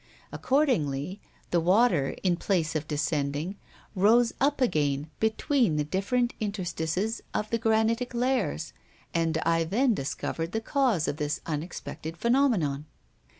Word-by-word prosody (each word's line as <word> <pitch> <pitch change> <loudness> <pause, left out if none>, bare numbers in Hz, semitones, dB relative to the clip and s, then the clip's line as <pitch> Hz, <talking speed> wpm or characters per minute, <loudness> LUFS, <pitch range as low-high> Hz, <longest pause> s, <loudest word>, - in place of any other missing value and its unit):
Accordingly, 190 - 0 0.3
the 175 - +3
water, 180 - +3
in 180 -2 +3
place 170 -3 0
of 155 0 -2
descending, 150 +3 -1 0.4
rose 225 +4 +4
up 285 +1 +2
again 150 - 0
between 220 - +2
the 150 - +1
different 200 +10 0
interstices 195 0 -2
of 210 - -2
the 230 - +1
granitic 225 +2 +1
layers. 240 -10 0 0.4
And 165 -1 +1
I 165 0 +3
then 230 +9 +2
discovered 165 +2 -3
the 220 - +1
cause 230 - +1
of 145 - -2
this 150 -1 -2
unexpected 160 0 -5
phenomenon. 205 - +1
185 Hz, 125 wpm, -27 LUFS, 155-230 Hz, 0.4 s, rose